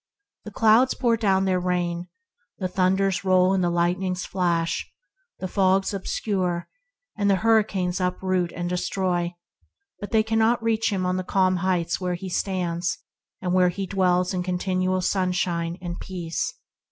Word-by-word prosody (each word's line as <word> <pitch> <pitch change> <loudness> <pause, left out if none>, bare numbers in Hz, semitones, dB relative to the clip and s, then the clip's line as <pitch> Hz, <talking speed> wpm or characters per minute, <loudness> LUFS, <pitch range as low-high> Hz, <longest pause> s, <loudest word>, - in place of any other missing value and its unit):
The 210 - -7
clouds 225 +5 +4
pour 235 -3 +2
down 195 -4 +2
their 185 -1 +1
rain, 175 -1 -1 0.5
the 185 - -2
thunders 190 +1 +1
roll 185 0 +4
and 190 -1 +1
the 175 - +2
lightnings 180 +2 0
flash, 170 -2 -1 0.5
the 185 - -4
fogs 190 +1 +2
obscure, 185 -3 -2 0.5
and 205 -1 +1
the 195 - +5
hurricanes 195 -4 +1
uproot 180 -1 0
and 175 0 -3
destroy, 180 -1 -1 0.6
but 205 - -6
they 220 -2 +3
cannot 225 +1 +2
reach 225 -1 +1
him 190 -2 -1
on 180 0 0
the 185 - -2
calm 185 0 +2
heights 180 -1 0
where 180 -1 -1
he 185 +2 -6
stands, 175 -2 -1 0.5
there 180 0 +3
to 195 +2 -4
dwell 180 -1 +2
in 180 - -1
continual 185 +1 0
sunshine 180 -2 0
and 175 0 -5
peace. 175 -3 -3
185 Hz, 150 wpm, -24 LUFS, 180-195 Hz, 0.6 s, the